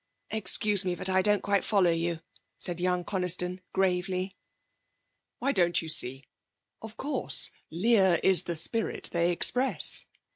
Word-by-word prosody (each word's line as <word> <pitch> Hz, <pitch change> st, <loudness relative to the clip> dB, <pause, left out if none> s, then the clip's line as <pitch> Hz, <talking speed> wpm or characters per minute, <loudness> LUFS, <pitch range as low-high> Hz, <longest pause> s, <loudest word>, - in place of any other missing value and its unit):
'Excuse 210 Hz, -1 st, +2 dB
me, 180 Hz, -1 st, -2 dB
but 185 Hz, -, -4 dB
I 190 Hz, 0 st, +3 dB
don't 205 Hz, 0 st, +1 dB
quite 200 Hz, -1 st, +1 dB
follow 195 Hz, -5 st, +2 dB
you,' 165 Hz, 0 st, -2 dB, 0.4 s
said 175 Hz, -2 st, -2 dB
young 180 Hz, 0 st, 0 dB
Coniston 180 Hz, -1 st, 0 dB
gravely. 185 Hz, 0 st, -1 dB, 1.0 s
'Why, 275 Hz, -, -1 dB
don't 175 Hz, -6 st, +1 dB
you 165 Hz, -, -6 dB
see? 135 Hz, -3 st, 0 dB, 0.6 s
Of 220 Hz, 0 st, -10 dB
course, 295 Hz, -, 0 dB, 0.2 s
Lear 190 Hz, 0 st, +2 dB
is 190 Hz, -2 st, +4 dB
the 170 Hz, -, -3 dB
spirit 225 Hz, +8 st, -2 dB
they 170 Hz, 0 st, +1 dB
express. 250 Hz, +9 st, +2 dB
185 Hz, 140 wpm, -28 LUFS, 175-200 Hz, 1.0 s, is